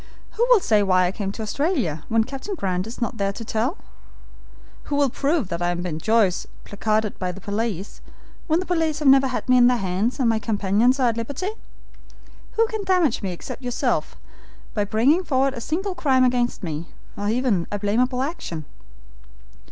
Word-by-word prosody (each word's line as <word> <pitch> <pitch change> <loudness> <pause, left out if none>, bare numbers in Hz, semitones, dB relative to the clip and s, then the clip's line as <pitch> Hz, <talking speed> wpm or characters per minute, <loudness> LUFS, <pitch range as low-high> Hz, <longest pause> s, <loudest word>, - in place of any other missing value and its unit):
Who 475 +2 +1
will - - +7
say 215 - +3
why 185 -2 +3
I 180 - 0
came 195 0 -3
to 220 - -5
Australia, 220 - -1
when 225 0 +3
Captain 270 - -6
Grant 185 - -2
is 230 - -8
not 235 - -1
here 200 0 +1
to 230 - -7
tell? 220 +2 -1 1.1
Who 290 - -2
will 285 -3 +2
prove 280 - 0
that 170 -1 -3
I 175 - +1
am 175 - -1
the 175 - -4
Ben 165 -3 -3
Joyce 215 -1 +2 0.2
placarded 215 +1 -1
by 185 -1 -1
the 185 - -10
police, 205 -1 -3 0.5
when 320 0 +2
the 370 - -3
police 325 -4 0
have 300 -2 0
never 270 0 +6
had 255 - -4
me 255 0 +5
in 245 -1 +7
their 250 0 +3
hands, 195 +6 -1
and 255 - +2
my 225 -1 +2
companions 220 +4 +2
are 250 -2 +4
at 230 - -3
liberty? 285 - -3 1.0
Who 455 - +3
can 440 -2 -4
damage 360 - +2
me 195 -3 -2
except 175 +8 -7
yourself, 245 -1 -1 0.6
by 205 -2 0
bringing 260 - +3
forward 270 -4 +1
a 240 - -6
single 370 - -2
crime 275 -7 +2
against 245 -3 +1
me, 160 -1 -4 0.3
or 205 0 -2
even 225 -7 +1
a 205 - -1
blameable 250 +6 +1
action? 175 - -5
230 Hz, 195 wpm, -23 LUFS, 200-275 Hz, 1.1 s, will